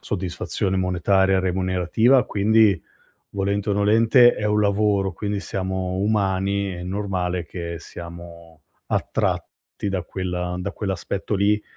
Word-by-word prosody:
soddisfazione 95 0 -2
monetaria 95 +1 +2
remunerativa, 95 +7 +2
quindi 105 -2 +3 0.5
volente 100 +1 -1
o - - +2
nolente 115 +5 +5
è 105 - -4
un 105 0 +2
lavoro, 100 -1 +1
quindi 100 +2 -3
siamo 95 -1 -3
umani, 100 -1 0
è 90 -1 -7
normale 90 -2 -2
che 85 0 -6
siamo 85 -2 -11 0.2
attratti - - -2
da 95 -2 -2
quella 90 0 -4
da 95 +3 -4
quell'aspetto 100 +1 -3
lì. 105 +2 +2
95 Hz, 115 wpm, -23 LUFS, 90-105 Hz, 0.5 s, nolente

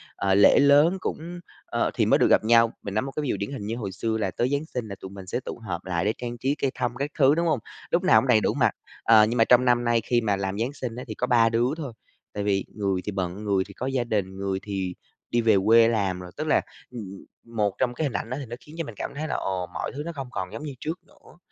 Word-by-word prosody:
ờ, 95 -1 +1
lễ 100 - +6
lớn 145 +6 +5
cũng, 175 -1 -5 0.3
ơ - - -1
thì - - +1
mới - - +4
được - - +4
gặp - - +5
nhau. 115 +1 +4
Mình 100 - -5
nói 110 - +1
một 135 - -5
cái 150 - -1
ví 140 - -2
dụ - - 0
điển 100 +6 -4
hình 135 -7 -5
như 115 - -2
hồi 105 -5 -4
xưa 110 +3 -2
là 100 -4 -1
tới 120 +6 0
Giáng 140 +2 -1
Sinh 125 -7 -5
là 100 - -6
tụi 95 - -8
mình 95 -1 -10
sẽ 95 - -2
tụ 125 - -7
hợp 85 -1 -4
lại 90 -1 -1
để 105 - +2
trang 120 -1 -5
trí 135 +4 0
cây 135 -3 -1
thông 120 -1 -2
các 140 +4 -3
thứ, 140 +1 +6
đúng 170 +1 +1
hông? 155 -6 +2 0.3
Lúc 175 - +2
nào 185 - +6
cũng - - -3
đầy 115 -4 +5
đủ - - +1
mặt, - - +3 0.3
ờ, 110 -2 +7
nhưng 115 +3 -2
mà 115 - +6
trong 125 +1 +5
năm 120 -1 +3
nay 120 -1 +2
khi 120 0 +1
mà 105 -3 +1
làm 95 +1 -3
Giáng 120 +5 -1
Sinh 125 -5 -5
á 125 - -6
thì - - -5
có 125 - -1
3 115 -2 +4
đứa 115 +2 +2
thôi, 140 -7 -6 0.4
tại 105 - -3
vì 100 -1 +1
người 100 -3 -1
thì 105 - -2
bận, 95 +1 -3
người 100 -2 +1
thì 100 - -12
có 125 - -5
gia 135 -2 0
đình, 100 -5 -2
người 95 -1 -2
thì 95 -3 -3 0.3
đi 120 - +1
về 110 -2 +4
quê 115 +1 +7
làm 100 -5 0
rồi. 90 -1 -9
Tức 155 +1 -3
là, 155 - +4 0.3
ừm, 100 -6 -8 0.3
một 105 -3 +1
trong 125 -1 +1
cái 155 - -2
hình 135 - -2
ảnh - - -3
đó 130 - -3
thì 140 - -5
nó 120 0 -7
khiến 150 +6 -14
cho 165 - -2
mình 115 - -9
cảm - - -4
thấy 155 +2 -3
là - - -2
ồ, 95 -2 -2
mọi - - -3
thứ 145 +2 -5
nó 170 - -3
không 135 -2 -5
còn - - -4
giống - - -6
như 145 -2 -5
trước 160 +6 -4
nữa, - - -20
115 Hz, 300 wpm, -25 LUFS, 100-135 Hz, 0.4 s, ờ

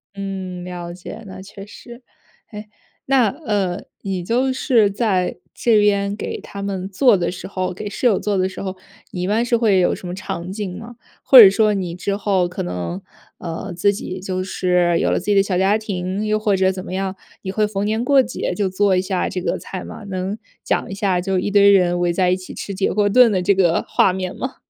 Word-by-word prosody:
嗯， 190 -2 -5
了 175 -1 -7
解， 185 +5 -9
那 190 0 -9
确 195 0 -11
实。 235 +4 -13 0.5
哎， 210 0 -9 0.4
那， 260 -4 +3
呃， 205 - -2 0.2
你 190 -3 -3
就 250 +7 +1
是 245 -5 +2
在 195 -3 0 0.2
这 225 -3 +3
边 200 -1 +2
给 - - -5
他 200 0 -8
们 195 -1 -4
做 225 +4 +4
的 175 -2 -1
时 180 - -8
候， 185 -1 -3
给 210 +3 -7
室 230 +5 0
友 210 -5 +2
做 205 -1 -1
的 185 0 +1
时 - - -8
候， 190 -1 -4 0.4
你 180 - -5
一 180 - -1
般 220 +4 +1
是 240 0 +1
会 215 -5 +3
有 175 - +2
什 180 - -7
么 175 - -5
场 185 -1 -5
景 195 -3 -5
吗？ 235 +2 -10 0.3
或 265 - +8
者 205 -5 +11
说 215 +1 +2
你 180 -3 -3
之 200 +3 -3
后 195 -3 +1
可 180 - -5
能， 90 0 -4 0.4
呃， 175 +3 -6
自 200 +4 +2
己 190 -2 -6
就 185 0 -3
是 180 -2 +1
有 - - +1
了 - - +1
自 185 - -11
己 205 -1 +2
的 195 - +5
小 185 -2 -1
家 195 +3 +3
庭， 195 -1 -3
又 215 0 +1
或 210 -2 +1
者 190 0 +2
怎 185 -1 -6
么 - - -7
样， 190 0 -2 0.3
你 190 - -3
会 210 +2 +1
逢 200 -1 -3
年 220 +2 0
过 270 0 +4
节 - - -3
就 205 -2 0
做 190 +1 +2
一 185 - +2
下 185 -1 -2
这 185 -2 -4
个 - - -2
菜 190 - -7
吗？ - - -9
能 190 +2 -4 0.2
讲 - - -1
一 195 - -5
下 190 -3 0
就 190 0 -1
一 195 +3 -1
堆 200 0 +6
人 175 -2 +3
围 175 -1 +1
在 180 +1 +1
一 185 - +3
起 185 - -10
吃 200 - -6
铁 190 +1 0
锅 205 0 +2
炖 240 +2 +5
的 185 -3 0
这 200 +3 +4
个 175 -3 +2
画 190 - +3
面 185 -1 -4
吗？ 260 +1 -5
195 Hz, 250 characters per minute, -20 LUFS, 185-210 Hz, 0.5 s, 者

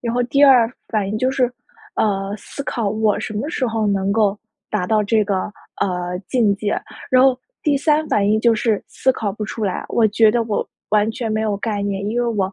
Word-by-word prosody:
然 235 -1 -2
后 245 - +2
第 280 +4 +4
二 250 -5 +6 0.2
反 210 -4 -1
应 210 - -2
就 255 +2 +1
是， 255 -2 +1 0.4
呃， 200 -1 0
思 280 +6 -8
考 230 -7 -1
我 215 0 +1
什 - - -5
么 220 +8 -2
时 280 -6 -1
候 225 -2 -1
能 200 -1 +1
够 210 -2 +2 0.3
达 205 -4 -1
到 215 +2 +2
这 215 +1 +2
个， 195 -1 -1 0.3
呃， 180 -1 -1
境 225 -6 +2
界。 205 +1 -2 0.3
然 255 0 +5
后 260 -1 +4 0.2
第 295 -3 +2
三 305 +2 +2
反 200 -1 +2
应 215 - +3
就 235 -1 +4
是 220 -1 0
思 260 - +1
考 220 -6 -2
不 215 +1 -5
出 215 +1 -4
来， 190 - -2
我 225 -2 +3
觉 215 +1 +4
得 235 +1 +1
我 215 -2 -2 0.2
完 210 +1 +3
全 225 0 -4
没 215 - 0
有 210 -2 0
概 205 0 -2
念， 200 0 -2
因 235 +3 0
为 240 - 0
我 200 -4 -1
215 Hz, 245 characters per minute, -20 LUFS, 205-240 Hz, 0.4 s, 二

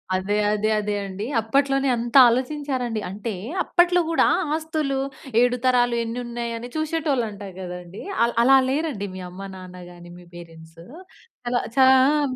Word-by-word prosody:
అదే, 190 +2 -1 0.2
అదే, 210 +1 0
అదే 210 0 -2
అండి. 195 +2 -6 0.2
అప్పట్లోనే 275 +4 +1
అంత 235 +1 -5
ఆలోచించారండి 255 -2 -1
అంటే 210 +4 -5 0.3
అప్పట్లో 355 0 +3
గూడా 330 - +3 0.3
ఆస్తులు, 310 -4 -2 0.4
ఏడు 245 0 +2
తరాలు 245 -1 +3
ఎన్ని 230 +2 -5
ఉన్నయి? 235 0 -5
అని 235 +1 -7
చూసేటోళ్ళు 310 -5 -1
అంటారు 200 -2 -10
గదండీ. 180 +1 -8 0.2
అల్ 235 - -3
అలా 270 +2 +6
లేరండి 275 -8 -2
మీ 185 - -7
అమ్మ, 180 +2 -11
నాన్న 180 -1 -11
గాని 175 0 -13
మీ 175 - -15
పేరెంట్స్. 165 -1 -13 0.7
అలా 245 0 +1 0.2
చా 265 - +7 0.2
ఆహ్ 285 -1 +2
240 Hz, 150 wpm, -23 LUFS, 195-275 Hz, 0.7 s, చా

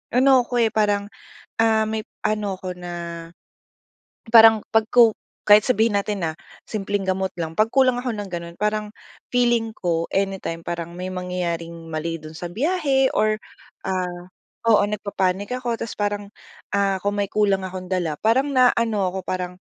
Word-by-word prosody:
ano 260 0 +6
ako, 245 - -2
eh, 220 - +2
parang, 205 -2 +1 0.6
ah, 220 -1 +3
may 220 0 -2 0.2
ano 205 -3 -2
ako 180 -1 -6
na 175 0 -7 1.4
parang 225 -2 +8
'pag 225 -1 +3
ko 235 -3 +6 0.3
kahit 210 0 +8
sabihin 230 -3 +2
natin 200 -1 -3
na, 160 - -3 0.3
simpleng 200 -2 -2
gamot 190 0 0
lang, 165 -1 -3
pag 215 +5 +2
kulang 255 -2 +3
ako 250 - -2
ng 205 -1 -5
gano'n, 170 -1 -6
parang 210 0 -1 0.4
feeling 240 -2 +2
ko 165 -2 0
anytime 195 -4 -2
parang 170 -1 -4
may 180 - -4
mangyayaring 180 -2 -3 0.2
mali 165 +1 -3
do'n 155 0 -10
sa 170 +2 -6
biyahe 275 - +1
or 215 0 +2 0.5
ah, 180 -2 -2 0.5
oo, 210 -2 +6
nagpapanic 200 0 -2
ako 245 -2 -2
tapos 230 - -5
parang, 205 0 -1 0.5
ah, 200 -1 +2
kung 205 0 0
may 200 - +1
kulang 200 -2 +2
akong 185 0 -7
dala 175 -5 0
parang 260 +6 +3
naano 235 -4 +3
ako 190 +1 -5
parang 180 -1 -3
205 Hz, 160 wpm, -22 LUFS, 180-225 Hz, 1.4 s, parang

